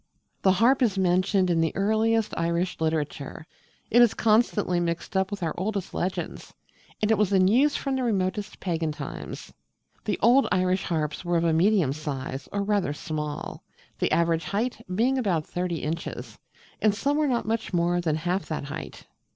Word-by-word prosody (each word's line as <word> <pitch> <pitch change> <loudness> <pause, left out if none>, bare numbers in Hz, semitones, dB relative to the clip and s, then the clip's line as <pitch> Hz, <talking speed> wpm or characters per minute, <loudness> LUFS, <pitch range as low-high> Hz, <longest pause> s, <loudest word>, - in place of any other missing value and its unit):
The 190 - +4
Harp 245 +7 +3
is 215 -6 +2
mentioned 185 0 +2
in 165 -1 +2
the 160 - 0
earliest 220 +2 +1
Irish 170 +2 -1
literature: 155 -2 -2 0.5
it 240 - +6
is 240 -3 +5
constantly 215 -5 +2
mixed 170 +2 -3
up 190 0 +2
with 200 -3 -5
our 160 - -1
oldest 200 0 -3
legends; 185 +1 -4 0.5
and 210 - +3
it 220 - +3
was 210 -2 +2
in 185 -1 +4
use 270 +8 +4
from 275 -1 -1
the 260 - -1
remotest 205 -3 -1
pagan 165 -4 -1
times. 150 - -7 0.5
The - - 0
old 255 +4 +5
Irish 185 0 +1
harps 155 -2 -2
were 175 -1 +1
of 165 - +1
a 165 -1 +2
medium 175 -4 +3
size, 140 -2 -5
or 200 0 -1
rather 200 -7 0
small, 150 -1 -5 0.4
the - - +1
average 165 -1 +2
height 230 +3 -2
being 255 +6 +2
about 175 -10 0
thirty 175 -2 -3
inches: 165 +3 -5 0.4
and 210 -2 +3
some 280 +7 0
were 305 0 +2
not 245 -3 0
much 225 0 -2
more 175 0 +1
than 160 -3 0
half 180 +4 -2
that 155 - -3
height. 145 +3 -7
185 Hz, 175 wpm, -26 LUFS, 165-215 Hz, 0.5 s, it